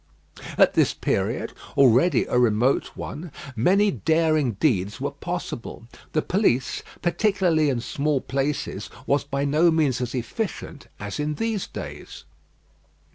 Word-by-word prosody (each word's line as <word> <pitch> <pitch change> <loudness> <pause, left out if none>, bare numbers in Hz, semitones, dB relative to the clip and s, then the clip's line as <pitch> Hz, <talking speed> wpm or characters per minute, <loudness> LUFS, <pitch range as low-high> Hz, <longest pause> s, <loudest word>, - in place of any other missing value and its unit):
At - - +5
this - - +2
period, - - -1 0.2
already 130 +3 +5
a 125 - +1
remote 120 +2 +2
one, 160 +2 -6 0.2
many 195 - +3
daring 155 -7 +2
deeds 100 - 0
were 140 +2 -2
possible. 145 -7 -6 0.3
The 155 - +1
police 155 - +1 0.2
particularly 175 -4 +2
in 125 -3 -1
small 145 +3 0
places 140 +2 -2 0.2
was 140 +1 +2
by 140 0 -2
no 155 +5 +4
means 155 -6 +1
as 125 +1 -3
efficient 150 - -4
as 105 +6 -5
in 150 0 -1
these 225 -1 -2
days. - - -8
145 Hz, 130 wpm, -24 LUFS, 125-170 Hz, 0.3 s, At